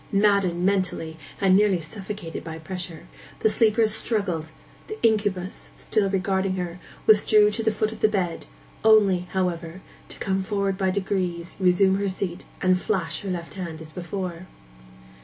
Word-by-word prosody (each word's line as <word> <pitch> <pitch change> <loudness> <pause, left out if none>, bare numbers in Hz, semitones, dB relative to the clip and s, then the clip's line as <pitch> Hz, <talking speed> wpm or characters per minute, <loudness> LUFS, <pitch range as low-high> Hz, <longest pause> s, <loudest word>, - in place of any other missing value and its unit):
Maddened 200 -4 +2
mentally, 185 -5 0 0.2
and 190 -1 +4
nearly 200 -2 +4
suffocated 195 +1 -6
by 160 -1 -6
pressure, 170 0 -6 0.4
the 220 - +4
sleeper 225 0 +3
struggled; 200 -7 0 0.4
the 430 - -6
incubus, 205 -4 0
still 205 -3 0
regarding 190 0 0
her, 180 -1 -4 0.3
withdrew 210 0 +5
to 225 - -2
the 220 - +2
foot 215 0 -1
of 220 - -9
the - - +5
bed, 185 - -2 0.4
only, 200 -5 +5
however, 180 -1 -2 0.3
to - - -8
come 190 0 -1
forward 200 -1 -1
by 190 0 0
degrees, 185 -3 -2
resume 190 +1 +4
her 200 -1 0
seat, 185 -1 -4 0.2
and 185 0 +3
flash 165 -4 -1
her 200 - -5
left 170 -2 -4
hand 170 -5 -6
as 160 -1 -10
before. 180 +1 -5
190 Hz, 155 wpm, -25 LUFS, 175-205 Hz, 0.4 s, withdrew